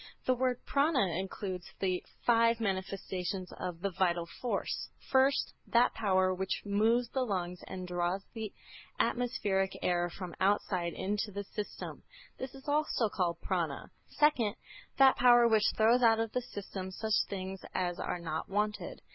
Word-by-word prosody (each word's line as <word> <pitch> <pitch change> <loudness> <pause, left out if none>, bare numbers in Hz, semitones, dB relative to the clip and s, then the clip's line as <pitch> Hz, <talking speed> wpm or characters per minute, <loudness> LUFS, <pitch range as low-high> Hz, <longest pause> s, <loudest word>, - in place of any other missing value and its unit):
This 255 - +3
word 250 0 +1
Prâna 275 - +2
includes 190 -1 -5
the 185 -2 0 0.2
five 230 -1 +4
manifestations 190 -2 -3
of 175 -2 -4
the 200 0 -1
vital 170 -2 +1
force: 245 - -2 0.2
First, 270 +1 +3
that 240 +1 +4
power 185 -3 +2
which 190 +1 -2
moves 225 +4 +2
the 265 - -1
lungs 180 -6 -2
and 185 -1 -6
draws 175 +2 -1
the 220 -3 -5 0.5
atmospheric 200 -6 0
air 175 0 +1
from 175 0 -7
outside 185 -3 +1
into 210 +2 -2
the 200 +1 -4
system. 205 +1 -6 0.4
This 260 +1 -6
is 270 +2 -13
also 290 -6 +1
called 175 -4 -1
Prâna. - - -1 0.2
Second, 260 -9 +2 0.4
that 270 -1 +7
power 240 -1 +7
which 220 -2 +4
throws 230 +3 +5
out 225 -2 +5
of 225 -1 -1
the 250 - -1
system 200 -5 -6
such 220 +3 -3 0.2
things 190 -1 -5
as 175 -1 -1
are - - -2
not 160 -2 -4
wanted. 210 +1 -2
200 Hz, 150 wpm, -32 LUFS, 185-235 Hz, 0.5 s, that